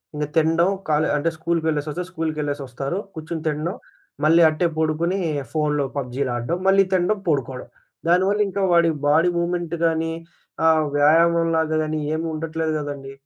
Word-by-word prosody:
ఇంక 150 0 -1
తినడం 165 +2 +3 0.2
కాలే 155 +1 +2
అంటే 155 +3 0
స్కూల్‌కెళ్ళేసొస్తే, 160 -1 -1
స్కూల్‌కెళ్ళేసొస్తారు. 145 -3 -3 0.2
కూర్చొని 160 -1 -6
తినడం, 155 +4 -2 0.5
మళ్ళీ 165 +2 +5
అట్టే 155 +3 0
పడుకొని 160 +4 0 0.3
ఫోనులో 150 -2 0
పబ్‌జీలు 130 0 -2
ఆడడం, 120 +8 -2
మళ్ళీ 195 0 +6
తినడం, 185 +3 +1
పడుకోవడం. 130 -4 -2 0.4
దానివల్లింకా 195 +2 +2
వాడి 170 -1 +4 0.2
బాడీ 160 +4 +4
మూవ్‌మెంట్ 170 -1 -1
గానీ 165 0 0 0.6
ఆహ్, 160 -1 +4
వ్యాయామంలాగా 165 +1 +3
గాని 155 0 -2 0.2
ఏమీ 160 +1 -2
ఉండట్లేదు 160 0 -2
గదండీ. 140 -2 -6
160 Hz, 125 wpm, -22 LUFS, 150-170 Hz, 0.6 s, మళ్ళీ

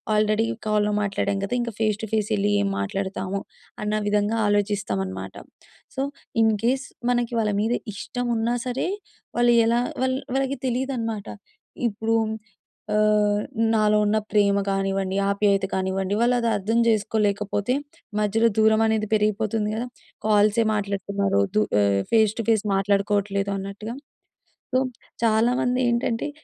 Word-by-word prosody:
Already 215 +1 +2 0.2
కాల్‌లో 210 0 +2
మాట్లాడాం 200 0 -1
కదా! 245 - -5
ఇంక 235 -1 -3
ఫేస్ 215 -1 +1
టు 215 - -4
ఫేస్ 210 0 0
యెళ్ళి 205 +1 +1
ఏం 200 - 0
మాట్లాడతామో 195 - -3 0.4
అన్న 210 0 -1 0.2
విధంగా 210 +2 +1
ఆలోచిస్తామనమాట. 100 - -1 0.6
సో, - - 0 0.4
ఇన్‌కేస్ 230 +6 +1 0.2
మనకి 240 -1 0
వాళ్ళ 215 -1 +1
మీద 225 +3 +1 0.2
ఇష్టమున్నా 235 +2 -2
సరే, 250 0 -2 0.5
వాళ్ళు 240 0 +4
ఎలా 235 +1 +2 0.2
వాళ్ 260 0 +1 0.2
వాళ్ళకి 270 0 0
తెలీదనమాట. 240 -4 -2 0.6
ఇప్పుడు 225 +1 -1 0.8
ఆహ్, 210 -1 +3 0.3
నాలో 215 -1 +3
ఉన్న 215 +1 +2
ప్రేమ 200 -1 +3
కానివ్వండి, 195 -1 -1
ఆప్యాయత 200 -1 +2
కానివ్వండి, 190 +1 -1
వాళ్ళది 240 -1 +2
అర్థం 225 +4 0
చేసుకోలేకపోతే, 210 0 +1 0.5
మధ్యలో 220 +2 +2
దూరమనేది 220 0 +3
పెరిగిపోతుంది 215 0 +1
గదా! 240 +3 -3 0.4
కాల్సే 210 +1 +4
మాట్లాడుతున్నారు, 200 -1 0
దు 215 - +4 0.2
ఆహ్, 100 -1 +2
ఫేస్ 220 -2 +4
టు 230 - -2
ఫేస్ 220 -2 +2
మాట్లాడుకోవట్లేదు 200 0 +1
అన్నట్టుగా. 200 +4 -6 0.8
సో, 260 - +4 0.4
చాలామందేంటంటే, 240 +2 +1
210 Hz, 120 wpm, -24 LUFS, 200-230 Hz, 0.8 s, వాళ్ళు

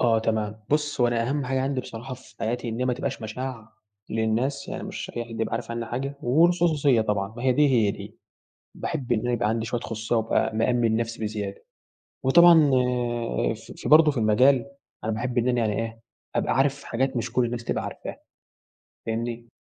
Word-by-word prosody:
آه 115 -2 +4
تمام، 110 -1 -1
بُص 150 -2 0
هو 120 - +5
أنا 115 0 0
أهمّ 145 0 -1
حاجة 130 +1 0
عندي 135 -1 -1
بصراحة 125 +2 -7
في 130 -1 -17
حياتي، 120 +2 -2
إن 115 +1 -4
هي 125 - +1
ما 125 - +1
تبقاش 135 0 -4
مشاع 110 0 -6 0.4
للناس، 115 +5 -1
يعني - - -5
مش - - -6
أي 120 - -2
حد 115 -1 -7
يبقى 115 - -1
عارف 115 0 -4
عني 115 0 -3
حاجة، 135 +4 -3
والخُصوصيَّة 155 -2 +3
طبعًا، 105 0 -2
ما 120 - -6
هي 130 - +3
دي، 150 +3 +4
هي 115 -6 +3
دي. - - -9 0.6
باحب 140 -8 -4
إن 115 - +3
أنا 125 +2 -1
يبقى 120 -2 +1
عندي 115 0 -1
شويَّة 120 +1 -2
خُصوصيَّة، 110 +1 -2
وأبقى 110 0 +1
مأمِّن 115 0 +2
نفسي 115 0 -2
بزيادة، 105 -2 -4 0.6
وطبعًا 160 +1 +7 0.8
ف - - -12 0.2
في - - -5
برضو 155 +2 +7
في 145 - -6
المجال، 125 +5 +4 0.3
أنا 110 - 0
باحب 120 +3 -2
إن 120 +1 +2
أنا 125 - +2
يعني 110 -1 0
إيه، 115 0 -8 0.3
أبقى - - +1
عارف 140 +1 +1
حاجات 130 +2 -1
مش 120 - -2
كُلّ 125 - +2
الناس 120 0 -4
تبقى - - -2
عارفاها، - - -7 0.9
فاهمني؟ 115 +1 -3
120 Hz, 195 wpm, -25 LUFS, 110-135 Hz, 0.9 s, وطبعًا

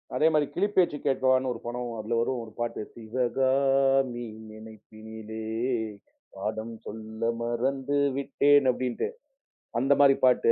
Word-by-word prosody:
அதே 160 - +4
மாரி 150 -1 +3
கிளிப்பேச்சு 185 -5 +2
கேட்கவான்னு 130 -1 +2
ஒரு 115 - -9
படம். 120 0 -4
அதுல 115 +2 -1
வரும் 125 0 -1
ஒரு 110 - -11
பாட்டு, 120 -2 -2
"சிவகாமி 130 +2 +1 0.2
நினைப்பினிலே 110 0 -10 1.0
பாடம் 110 +3 -4
சொல்ல 110 +1 -8 0.2
மறந்து 130 +4 -1 0.2
விட்டேன்" 140 0 +3
அப்படின்னுட்டு. 125 - -2 0.7
அந்த 135 +3 +4
மாரி 140 -1 +7
பாட்டு. 125 -1 +5
125 Hz, 115 wpm, -27 LUFS, 110-135 Hz, 1.0 s, மாரி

